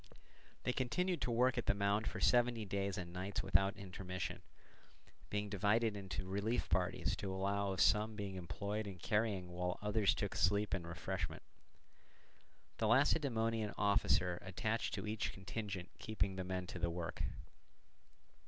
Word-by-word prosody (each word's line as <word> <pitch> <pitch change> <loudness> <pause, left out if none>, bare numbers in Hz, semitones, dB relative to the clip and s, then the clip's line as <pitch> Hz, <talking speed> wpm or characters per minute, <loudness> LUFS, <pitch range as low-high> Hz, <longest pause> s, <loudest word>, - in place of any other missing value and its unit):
They 125 - +1
continued 165 +7 0
to - - 0
work 125 +2 +3
at - - -4
the 100 - +4
mound 100 +2 +1
for - - -3
seventy 120 -2 +3
days 100 0 -1
and 85 -2 -5
nights 95 +2 -2
without 95 +1 +3
intermission, 90 -2 -5 0.9
being 105 0 -1
divided 105 +2 +2
into 95 -2 -4
relief 100 +5 0
parties 90 +1 +1
to 95 - -3
allow 100 +1 0
of 95 - 0
some 110 +1 +4
being 100 -2 -4
employed 100 +4 -3
in 95 -2 -6
carrying 105 -1 0
while 90 0 -2
others 105 -1 +2
took 100 - -2
sleep 100 +2 +2
and 85 -3 -2
refreshment; 85 -2 -3 1.4
the 110 - +2
Lacedaemonian 115 -4 +2
officer 95 -3 +3
attached 110 +4 -1
to - - -4
each 110 +1 -2
contingent 95 -1 -5
keeping 100 -3 -1
the 95 - -2
men 90 0 -2
to 90 - -6
the 85 0 +1
work. 85 -1 -4
100 Hz, 150 wpm, -38 LUFS, 95-110 Hz, 1.4 s, the